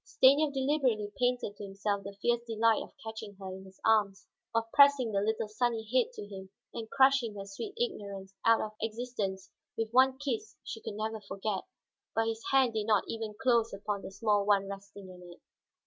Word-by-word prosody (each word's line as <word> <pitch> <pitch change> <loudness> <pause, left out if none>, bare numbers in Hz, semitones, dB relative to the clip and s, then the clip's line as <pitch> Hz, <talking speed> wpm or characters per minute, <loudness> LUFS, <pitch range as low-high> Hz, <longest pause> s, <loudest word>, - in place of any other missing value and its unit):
Stanief 285 +3 +4
deliberately 260 -7 +1
painted 245 -4 0
to - - -8
himself 200 +1 -2
the 200 0 -8
fierce 240 0 +2
delight 225 0 +3
of - - -9
catching 220 -2 -7
her 190 -1 -7
in 190 0 -11
his 190 0 -16
arms, 205 -3 +3 0.3
of 230 0 +1
pressing 280 -5 +6
the 200 -1 +1
little 220 +1 0
sunny 225 +1 0
head 260 - +3
to 205 - -7
him 190 -2 -9 0.2
and 225 -2 -6
crushing 265 -5 +4
her 195 -1 -6
sweet 200 - -7
ignorance 200 - -3
out 230 0 +5
of 215 - -3
existence 215 -4 -3 0.3
with 225 -1 -2
one 260 +2 +5
kiss 240 -6 -4
she 225 - -7
could 205 - -6
never 220 +1 -3
forget. 195 0 -3 0.5
But 225 - +2
his 225 0 -4
hand 265 -3 +4
did 215 -1 -2
not 210 -3 +4
even 220 -2 -4
close 235 -3 +2
upon 200 0 -3
the - - -7
small 205 +1 +1
one 200 -1 +3
resting 200 0 -9
in 180 -1 -12
it. - - -29
220 Hz, 195 wpm, -31 LUFS, 200-240 Hz, 0.5 s, pressing